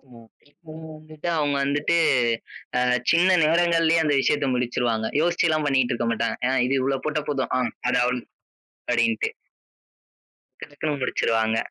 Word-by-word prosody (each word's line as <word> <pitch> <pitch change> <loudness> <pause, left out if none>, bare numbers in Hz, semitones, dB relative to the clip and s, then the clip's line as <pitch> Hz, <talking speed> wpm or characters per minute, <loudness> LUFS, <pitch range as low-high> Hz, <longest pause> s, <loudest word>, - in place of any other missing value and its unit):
ம். 115 -1 -16 0.4
அவங்க 160 +1 -10
வந்துட்டு 155 +2 -7
அவங்க 145 -2 0
வந்துட்டு, 145 +4 0 0.8
அ - - +2 0.3
சின்ன 180 +2 +4
நேரங்கலயே 165 0 +3
அந்த 145 - +2
விஷயத்த 145 0 +1
முடிச்சிருவாங்க. 120 -2 -1
யோசிச்சுலாம் 165 -2 +1
பண்ணிட்டு 130 -3 +1
இருக்கமாட்டாங்க. 115 -1 -1
ஏன்னா 130 +1 +1
"இது 135 - 0
இவ்ளோ 135 +1 -1
போட்டா 155 -1 -2
போதும். 135 -3 -2
அம். 120 -3 -1 0.2
அது 125 0 +2
அவ்ளவ்" 125 0 -2 0.7
அப்டின்னுட்டு. 230 - +1 1.3
டக் - - -9
டக்குன்னு 145 0 -3
முடிச்சிருவாங்க. 110 -3 0
145 Hz, 135 wpm, -23 LUFS, 125-160 Hz, 1.3 s, சின்ன